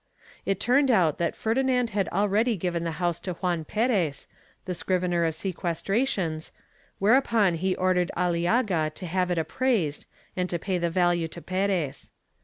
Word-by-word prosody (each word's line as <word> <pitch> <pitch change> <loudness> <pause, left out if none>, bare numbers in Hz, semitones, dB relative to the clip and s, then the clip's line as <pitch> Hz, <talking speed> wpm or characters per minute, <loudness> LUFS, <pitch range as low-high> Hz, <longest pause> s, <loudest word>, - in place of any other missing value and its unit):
It 195 -1 0
turned 265 +5 +3
out 175 - +3
that 170 -1 0
Ferdinand 250 +1 +1
had 195 -1 0
already 210 +4 +1
given 175 -1 -2
the 165 -1 -2
house 175 -2 0
to 185 - -4
Juan 175 -2 -1
Perez, 200 - 0 0.4
the 185 - -2
scrivener 175 -1 0
of 160 -1 -1
seques 175 -3 -3
trations, 195 -8 0 0.5
whereupon 220 -3 +3
he 185 +3 0
ordered 180 -1 +1
Aliaga 175 0 +1
to 185 - -7
have 180 +1 0
it 175 - 0
appraised 165 - 0 0.3
and 180 0 -1
to 175 - -1
pay 185 +1 -2
the 170 0 0
value 175 -1 +2
to 165 - -10
Perez. 185 -6 -1
180 Hz, 160 wpm, -26 LUFS, 170-205 Hz, 0.5 s, turned